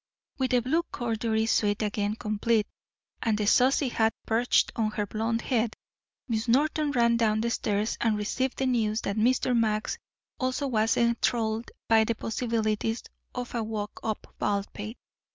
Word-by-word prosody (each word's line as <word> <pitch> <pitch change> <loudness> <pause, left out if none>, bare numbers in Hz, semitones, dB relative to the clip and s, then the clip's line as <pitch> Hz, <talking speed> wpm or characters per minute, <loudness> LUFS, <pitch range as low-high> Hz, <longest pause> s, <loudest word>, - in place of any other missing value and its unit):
With 260 -1 +1
the 250 -1 +3
blue 310 +7 +2
corduroy 225 -2 0
suit 210 -1 +1
again 210 0 -1
complete, 215 0 +1 0.6
and 220 -3 +1
the 210 - 0
saucy 260 +5 +4
hat 225 -1 +1
perched 230 +2 +2
on 220 -2 +1
her 210 -1 -2
blond 225 +3 -1
head, 230 -3 0 0.5
Miss 225 -1 -1
Norton 295 +5 +2
ran 235 -4 +3
down 215 -2 +2
the 235 +1 0
stairs 210 -1 -1
and 220 -2 +2
received 255 +5 -1
the 265 - 0
news 225 -4 +1
that 200 - -2
Mr. 245 +3 +2
Max 215 -2 0 0.4
also 255 +2 -1
was 225 -4 +1
enthralled 235 -1 +1 0.2
by 225 -1 +5
the 230 +1 -1
possibilities 225 -1 -1 0.3
of 245 -1 -4
a 235 - 0
walk 215 -1 -4
up 220 -2 -4
Baldpate. 205 +2 -2
225 Hz, 155 wpm, -28 LUFS, 215-240 Hz, 0.6 s, by